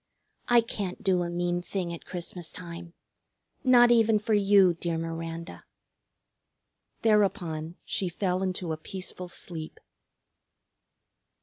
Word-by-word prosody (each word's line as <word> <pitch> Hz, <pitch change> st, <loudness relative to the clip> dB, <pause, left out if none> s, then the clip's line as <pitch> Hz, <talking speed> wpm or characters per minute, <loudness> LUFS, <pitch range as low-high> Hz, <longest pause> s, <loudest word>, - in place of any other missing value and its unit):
I 240 Hz, -1 st, +6 dB
can't 205 Hz, -3 st, -4 dB
do 185 Hz, -3 st, +3 dB
a 175 Hz, -, -2 dB
mean 175 Hz, 0 st, -1 dB
thing 175 Hz, -1 st, -3 dB
at 170 Hz, -, -10 dB
Christmas 175 Hz, -1 st, -5 dB
time, 170 Hz, -1 st, -8 dB, 0.7 s
not 245 Hz, -2 st, +7 dB
even 225 Hz, -2 st, +5 dB
for 220 Hz, +1 st, -1 dB
you, 200 Hz, -3 st, +5 dB
dear 170 Hz, 0 st, -2 dB
Miranda." 165 Hz, +1 st, -5 dB, 1.4 s
Thereupon 180 Hz, -7 st, +1 dB
she 185 Hz, -, -1 dB
fell 180 Hz, +1 st, -1 dB
into 185 Hz, -3 st, -2 dB
a -, -, -4 dB
peaceful 185 Hz, +2 st, -6 dB
sleep. 160 Hz, -2 st, -7 dB
180 Hz, 115 wpm, -28 LUFS, 170-205 Hz, 1.4 s, not